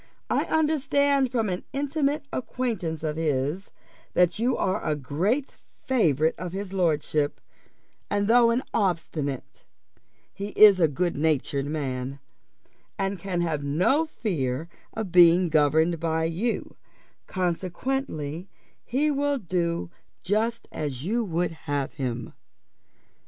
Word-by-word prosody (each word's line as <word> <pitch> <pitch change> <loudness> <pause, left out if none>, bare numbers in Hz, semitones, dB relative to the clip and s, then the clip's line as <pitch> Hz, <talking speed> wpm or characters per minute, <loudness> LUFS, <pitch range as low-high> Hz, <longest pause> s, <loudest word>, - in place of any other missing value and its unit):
I - - +2
understand 285 -4 +2
from 230 -4 +1
an 180 -1 -3
intimate 285 +1 0
acquaintance 220 - -3
of 155 -1 -2
his, 150 +3 -1 0.5
that 180 +3 +3
you 245 +2 +1
are 190 - 0
a 155 - 0
great 180 - -1 0.3
favourite 160 - +2
of 180 0 -5
his 195 0 -5
lordship; 155 -5 0 0.7
and 205 0 +1
though 235 +1 +6
an 240 +3 +1
obstinate, 165 - -2 0.7
he 200 +1 -6
is 205 -3 +9
a 165 - +5
good 170 +4 -1
natured 145 -2 0
man, 135 -3 -3 0.8
and 195 -1 -1
can 180 -1 -2
have 155 -4 -1
no 185 - +2
fear 160 - -2 0.3
of 220 -5 -4
being 175 0 +6
governed 160 +2 +3
by 160 0 0
you; 175 +9 -2 0.5
consequently 180 - -2 0.3
he 290 +5 +1
will 285 0 +1
do 170 -5 -2 0.3
just 220 +5 0
as 140 -4 -4
you 230 +7 0
would 175 -3 -1
have 145 -4 -3
him. 125 -4 -4
180 Hz, 120 wpm, -26 LUFS, 155-230 Hz, 0.8 s, is